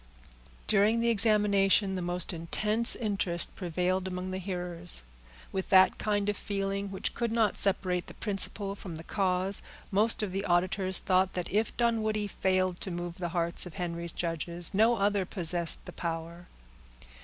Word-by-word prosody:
During 215 Hz, +2 st, +2 dB
the 235 Hz, 0 st, +1 dB
examination, 200 Hz, -2 st, +4 dB
the 185 Hz, -, -4 dB
most 175 Hz, +1 st, -1 dB
intense 210 Hz, +7 st, +4 dB
interest 195 Hz, -6 st, -1 dB
prevailed 180 Hz, +1 st, -2 dB
among 185 Hz, 0 st, -5 dB
the 185 Hz, -, -4 dB
hearers. 175 Hz, -, +1 dB, 0.5 s
With 190 Hz, -1 st, -4 dB
that 190 Hz, -1 st, +5 dB
kind 205 Hz, -1 st, -1 dB
of 205 Hz, -, 0 dB
feeling 195 Hz, 0 st, -4 dB
which 190 Hz, -1 st, -4 dB
could 235 Hz, -1 st, -3 dB
not 225 Hz, -3 st, +1 dB
separate 185 Hz, -2 st, +2 dB
the -, -, -11 dB
principle 200 Hz, -1 st, 0 dB
from 190 Hz, -4 st, -9 dB
the 160 Hz, -, -9 dB
cause, 190 Hz, 0 st, +3 dB, 0.3 s
most 215 Hz, +3 st, +1 dB
of 200 Hz, -, -3 dB
the 195 Hz, +1 st, -3 dB
auditors 185 Hz, +1 st, +1 dB
thought 185 Hz, 0 st, +1 dB
that 180 Hz, -1 st, -5 dB
if 215 Hz, +2 st, -1 dB
Dunwoodie 215 Hz, -3 st, -1 dB
failed 185 Hz, -1 st, -1 dB
to -, -, -2 dB
move 175 Hz, 0 st, -6 dB
the 175 Hz, -1 st, -3 dB
hearts 170 Hz, +1 st, -3 dB
of 180 Hz, -, -12 dB
Henry's 170 Hz, -2 st, -4 dB
judges, 170 Hz, +2 st, -3 dB
no 220 Hz, +4 st, +3 dB
other 200 Hz, -2 st, 0 dB
possessed 175 Hz, -2 st, 0 dB
the -, -, -10 dB
power. 170 Hz, +1 st, -6 dB
190 Hz, 160 wpm, -28 LUFS, 175-205 Hz, 0.5 s, that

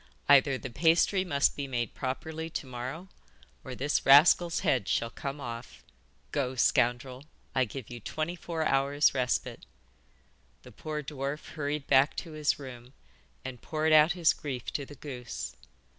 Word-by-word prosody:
'Either 140 Hz, -1 st, +5 dB
the 130 Hz, -, -6 dB
pasty 170 Hz, -, +3 dB
must 145 Hz, -6 st, +1 dB
be 140 Hz, -1 st, -4 dB
made 120 Hz, -3 st, -3 dB
properly 160 Hz, +5 st, -4 dB
to 150 Hz, -, -5 dB
morrow 130 Hz, +8 st, -6 dB, 0.6 s
or 130 Hz, -, -7 dB
this 140 Hz, +4 st, 0 dB
rascal's 165 Hz, +4 st, +6 dB
head 130 Hz, -, +1 dB
shall 115 Hz, 0 st, 0 dB
come 140 Hz, +3 st, -6 dB
off. 120 Hz, -2 st, -8 dB, 0.5 s
Go, 130 Hz, -2 st, -1 dB
scoundrel, 125 Hz, +2 st, +1 dB, 0.3 s
I 130 Hz, -1 st, +2 dB
give 125 Hz, +1 st, -8 dB
you 120 Hz, -, -7 dB
twenty 155 Hz, +9 st, -3 dB
four 165 Hz, -2 st, -3 dB
hours 140 Hz, +1 st, +3 dB
respite.' 125 Hz, -2 st, -2 dB, 1.0 s
The 125 Hz, -, -13 dB
poor 150 Hz, +7 st, -5 dB
dwarf 140 Hz, +1 st, -5 dB
hurried 145 Hz, -1 st, -3 dB
back 135 Hz, +2 st, +4 dB
to 165 Hz, -, -6 dB
his 155 Hz, -1 st, 0 dB
room, 125 Hz, -2 st, -10 dB, 0.5 s
and 130 Hz, -2 st, -7 dB
poured 155 Hz, 0 st, 0 dB
out 155 Hz, +3 st, +6 dB
his 170 Hz, -3 st, +3 dB
grief 130 Hz, -5 st, -6 dB
to 140 Hz, -2 st, -3 dB
the 145 Hz, -, -11 dB
goose. 125 Hz, -4 st, -7 dB
140 Hz, 155 wpm, -29 LUFS, 130-155 Hz, 1.0 s, rascal's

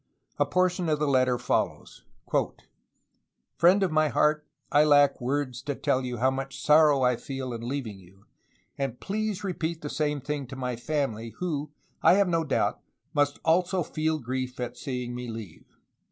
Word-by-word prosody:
A -, -, +3 dB
portion 180 Hz, -2 st, +1 dB
of 155 Hz, -, +2 dB
the 150 Hz, 0 st, 0 dB
letter 130 Hz, -2 st, +3 dB
follows: 120 Hz, -, -2 dB, 0.3 s
"^ -, -, +1 dB, 1.0 s
"Friend 185 Hz, +4 st, +5 dB
of 185 Hz, -, +1 dB
my 155 Hz, 0 st, +3 dB
heart, 150 Hz, +3 st, +1 dB, 0.2 s
I 145 Hz, -, +6 dB
lack 145 Hz, -3 st, +4 dB
words 130 Hz, -1 st, -2 dB
to 145 Hz, -, -3 dB
tell 130 Hz, 0 st, 0 dB
you 125 Hz, -1 st, -4 dB
how 130 Hz, +3 st, +3 dB
much 135 Hz, 0 st, -5 dB
sorrow 150 Hz, -3 st, +5 dB
I 125 Hz, 0 st, +4 dB
feel 135 Hz, -1 st, -5 dB
in 115 Hz, -, -5 dB
leaving 120 Hz, -5 st, -4 dB
you, 95 Hz, +2 st, -20 dB, 0.5 s
and 135 Hz, -3 st, -2 dB
please 210 Hz, 0 st, -2 dB
repeat 170 Hz, -4 st, -3 dB
the 145 Hz, -, -4 dB
same 150 Hz, -1 st, 0 dB
thing 145 Hz, 0 st, -4 dB
to 130 Hz, -, -8 dB
my 125 Hz, -2 st, -3 dB
family, 120 Hz, -4 st, -3 dB
who, 150 Hz, -5 st, -2 dB, 0.3 s
I -, -, +6 dB
have 200 Hz, -1 st, +3 dB
no 165 Hz, -2 st, +1 dB
doubt, -, -, 0 dB, 0.3 s
must 145 Hz, 0 st, +2 dB
also 175 Hz, +2 st, +2 dB
feel 155 Hz, +1 st, -1 dB
grief 130 Hz, -1 st, -4 dB
at 120 Hz, 0 st, -4 dB
seeing 125 Hz, -1 st, -4 dB
me 125 Hz, 0 st, -5 dB
leave. 110 Hz, -7 st, -8 dB
140 Hz, 175 wpm, -27 LUFS, 125-155 Hz, 1.0 s, I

